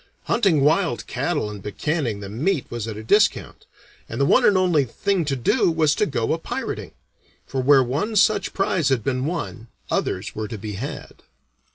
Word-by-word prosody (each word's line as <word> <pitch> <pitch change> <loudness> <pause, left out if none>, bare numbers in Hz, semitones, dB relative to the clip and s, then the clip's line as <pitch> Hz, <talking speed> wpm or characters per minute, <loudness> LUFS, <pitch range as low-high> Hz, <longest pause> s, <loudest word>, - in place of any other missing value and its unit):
Hunting 195 -11 +2
wild 160 -3 +2
cattle 145 0 -2
and 105 -1 -7
buccanning 115 - -2
the 100 - -6
meat 140 - -1
was 120 -2 -4
at 110 -2 -5
a 110 - -7
discount, 205 - +1 0.4
and - - -5
the - - +3
one - - +4
and 200 - +5
only 175 -6 +3
thing 180 - -1
to 140 -2 -1
do 155 - +2
was 160 -2 +2
to 210 - +1
go 120 -5 -1
a 165 - -2
pirating; - - -5 0.5
for 135 - -3
where 135 0 +5
one 150 - -2
such 210 +1 +3
prize 185 -6 0
had 130 -5 +1
been 130 +1 -1
won, 155 -9 -4 0.2
others - - -2
were 110 0 -4
to 110 - -6
be 105 +1 -6
had. 115 +9 -7
140 Hz, 190 wpm, -22 LUFS, 115-175 Hz, 0.5 s, and